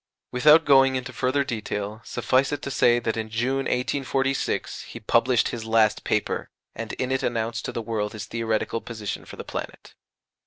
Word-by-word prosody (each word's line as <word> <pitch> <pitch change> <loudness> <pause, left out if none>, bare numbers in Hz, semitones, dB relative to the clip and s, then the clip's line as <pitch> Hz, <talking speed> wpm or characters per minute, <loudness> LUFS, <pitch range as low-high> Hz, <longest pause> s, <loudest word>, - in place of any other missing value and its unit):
Without 150 +5 +6
going 135 -1 +6
into 130 0 -4
further 130 +4 +1
detail, 110 -3 -4
suffice 135 +2 +1
it 145 -1 -3
to 140 - -3
say 120 -2 +4
that 115 -2 -1
in 110 -1 -3
June, 130 +5 0
1846, 135 +1 -1
he - - -9
published 115 +3 +2
his 115 -2 -5
last 110 -1 +2
paper, - - -1 0.2
and 115 0 -6
in 130 0 -2
it 135 - +1
announced 115 0 -2
to - - -3
the 115 - -4
world 105 -2 -2
his 110 -2 -6
theoretical 115 0 -1
position 110 -2 -5
for - - -10
the - - -7
planet. - - -7
120 Hz, 180 wpm, -25 LUFS, 110-130 Hz, 0.2 s, Without